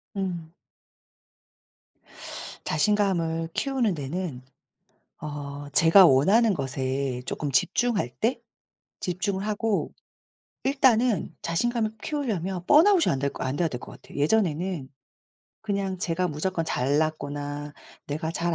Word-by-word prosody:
음. 180 -5 -3 2.1
자신감을 175 -6 +1
키우는 260 -7 0
데는 150 -1 -4 0.8
어 145 -1 -6
제가 165 +7 +7
원하는 195 - +5
것에 135 -3 -2
쪼끔 145 -2 -3
집중할 200 - +1
때 235 +4 0 0.6
집중을 190 +2 -2
하고 215 0 -1 0.7
일단은 250 - +2
자신감을 220 +6 0
키우려면 195 - -2
번아웃이 335 +4 +6
안 135 - -1
될 140 +1 0
것 - - -5
안 130 +2 -2
돼야 170 +1 +1
될 125 -5 -6
것 - - -10
같아요. - - -11
예전에는 170 -2 +1 0.7
그냥 200 -3 -2
제가 180 +1 0
무조건 165 +3 -2
잘났거나 145 0 -1 0.3
내가 155 +2 -3
잘 170 +1 0
175 Hz, 235 characters per minute, -26 LUFS, 145-210 Hz, 2.1 s, 제가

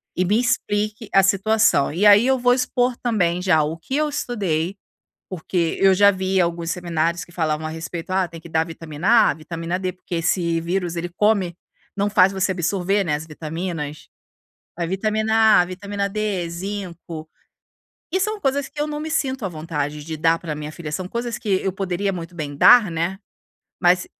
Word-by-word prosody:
e 185 - +1
me 205 +5 +2
explique 215 -2 -1
a 195 - +6
situação. 200 -5 +3
E 195 +5 +1
aí, 210 +4 +7
eu 265 0 +3
vou 245 0 +4
expor 250 -1 0
também 180 -7 0
já, 170 -5 +3
o 155 +2 -3
que 265 +11 -5
eu 305 0 +1
estudei, 195 - -2 0.5
porque 175 -1 -2
eu 195 -1 +6
já 200 +2 +6
vi 190 0 -1
alguns 170 -1 -1
seminários 170 -1 -1
que 175 - -19
falavam 155 -2 -1
a - - -4
respeito: 165 +2 -6
"Ah, 185 -1 +1
tem 165 -1 -10
que 170 - -11
dar 160 0 +1
vitamina 165 +2 -4 0.2
A, - - +1
vitamina 165 +3 -4
D, 185 -1 -2
porque 180 -1 -7
esse 165 0 0
vírus 175 0 -2
ele 175 +1 -3
come 195 -1 +1 0.4
não 205 +1 +1
faz 195 -2 +5
você 190 0 0
absorver, 195 +3 0
né, 150 -5 0
as 155 +2 -6
vitaminas. 155 -1 -5 0.7
A 170 -1 -2
vitamina 215 +3 +3
A, 175 - +3
vitamina 200 +2 -3
D, 200 -4 -2
zinco. 175 -3 -6 0.8
E 375 - +1
são 425 +2 -1
coisas 275 0 0
que 295 - -10
eu - - +1
não 300 0 -4
me 315 +1 -4
sinto 265 -7 -1
à - - -2
vontade 150 -2 -4
de 160 +1 -5
dar 165 +1 +3
pra 160 -3 -5
minha 150 0 -6
filha, 155 -2 -7
são 180 +4 -3
coisas 235 +3 -3
que 210 - -6
eu 190 - -1
poderia 195 +1 -2
muito 175 0 -7
bem 145 -4 -5
dar, 215 +3 +7
né, 170 +4 -2 0.6
mas 180 0 +4
180 Hz, 190 wpm, -22 LUFS, 165-205 Hz, 0.8 s, aí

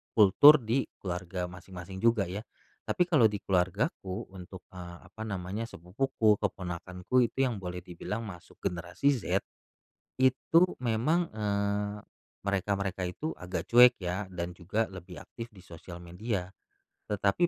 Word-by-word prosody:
kultur 125 +8 +8
di 115 +5 +1
keluarga 90 -1 -4
masing-masing 90 +1 -9
juga, 115 -1 +3
ya. 95 +2 -4 0.5
Tapi 180 - +3
kalau 150 -10 +6
di 105 -2 -5
keluargaku 95 - -1
untuk, 95 0 -10
eee, 85 -1 -8
apa 110 +2 -6
namanya, 100 +3 -3
sepupuku, 105 +3 +1
keponakanku 90 +5 -1
itu - - -22 0.2
yang 110 - -5
boleh 90 -1 -5
dibilang 105 +6 -5
masuk 90 -6 -10
generasi 90 +11 0
Z, 130 -6 0 0.8
itu 130 +5 +4 0.2
memang, 135 +9 +1
eee, 105 -1 -1 0.5
mereka-mereka 100 -1 -1
itu 150 - -4
agak 90 0 -5
cuek 125 +1 +9
ya 90 +3 -2
dan 85 -1 -4
juga 100 +6 -1
lebih 90 -1 -9
aktif 115 0 -9
di 95 - -14
sosial 85 0 -10
media. 90 +1 -3 0.6
Tetapi 100 - +2
100 Hz, 135 wpm, -30 LUFS, 90-115 Hz, 0.8 s, cuek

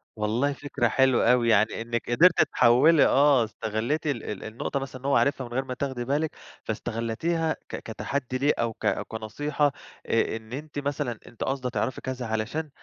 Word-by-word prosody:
والله 115 +7 0
فكرة 135 -4 -1
حلوة 130 -1 +3
أوي 120 -2 +3
يعني 110 +1 +3
إنِك 120 0 -3
قدرتِ 175 +9 +6
تحوّلي 140 +7 +6
آه 140 -3 +5
استغلِّتِ 110 +8 -2
ال 135 -6 -1
ال 105 - -6
النقطة 115 +5 -3
مثلًا، 130 -1 -7
إن - - -11
هو 140 - +2
عرِفها 140 -3 +1
من 120 - -10
غير 135 +1 -1
ما 130 - -4
تاخدي 130 -2 -3
بالِك 145 +4 -1 0.3
فاستغلتيها 160 +9 -1 0.2
ك - - -4
كتحدّي 125 +4 -4
ليه، 145 +3 +2
أو 115 -1 0
ك - - -3 0.2
كنصيحة 140 +7 -1 0.3
آآ 115 0 +1
إن 110 +2 -12
أنتِ 145 +1 -5
مثلًا 140 -5 -3
أنتِ 120 - -6
قاصدة 135 -2 -2
تعرفي 125 0 -2
كذا، 130 -1 -4
علشان 115 +8 -2
130 Hz, 180 wpm, -26 LUFS, 115-145 Hz, 0.3 s, قدرتِ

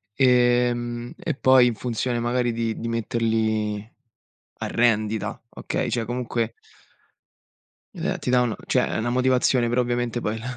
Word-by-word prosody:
Ehm, 120 -2 +2
e 160 - -3
poi 130 -2 +5
in 120 - -1
funzione 120 +1 -2
magari 120 +1 0
di 115 -1 -2
di 115 - -4
metterli 110 -2 -1 0.7
a - - -3
rendita, 110 -2 0
okay, - - -3
cioè 115 -2 -1
comunque 120 -1 -2 1.4
ehm, - - -2
ti - - -4
dà 125 0 +4
una, 120 -3 0
cioè - - +2
è - - -2
una 115 +2 -1
motivazione 125 -1 +2
però 120 +2 +2
ovviamente 120 -1 -1
poi 110 0 -2
là 125 +2 -6
120 Hz, 150 wpm, -24 LUFS, 115-125 Hz, 1.4 s, poi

